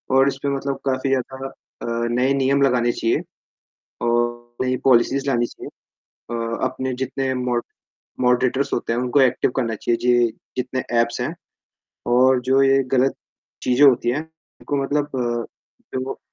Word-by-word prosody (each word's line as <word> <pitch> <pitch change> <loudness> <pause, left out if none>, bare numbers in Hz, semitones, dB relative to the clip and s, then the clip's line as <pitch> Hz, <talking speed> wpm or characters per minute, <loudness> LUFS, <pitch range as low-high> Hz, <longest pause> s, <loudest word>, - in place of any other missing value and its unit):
और 135 +1 +5
इस 135 - -1
पे 140 - +1
मतलब 135 0 -3
काफ़ी 130 0 0
ज़्यादा 135 0 -2
अ, 135 - -13 0.3
नए 125 +3 +2
नियम 140 +1 +2
लगाने 125 -3 +3
चाहिए 115 -1 0 0.9
और 120 0 -1
नई 130 0 +1
पॉलिसीज़ 135 +2 +3
लानी 120 -2 +2
चाहिए। - - -10 0.6
अ, 115 0 -2
अपने 130 0 -3
जितने 130 +1 -2
मॉड 125 -1 -1 0.6
मॉडरेटर्स 130 +2 +2
होते 115 - -2
हैं 120 - 0
उनको 125 +3 +2
एक्टिव 130 -1 +3
करना 115 -4 0
चाहिए। 115 +3 0
जि 120 -2 +3 0.2
जितने 130 0 -2 0.2
ऐप्स 115 +1 -1
हैं 135 +7 -2 0.8
और 130 0 +5
जो 135 +1 +5
ये 135 0 +4
ग़लत 130 +1 +3 0.5
चीज़ें 130 +3 +5
होती 120 -2 +3
हैं, 135 +5 0 0.4
उनको 140 -1 -1
मतलब 145 +1 -1 0.9
जो 130 +1 -3
130 Hz, 150 wpm, -22 LUFS, 120-135 Hz, 0.9 s, और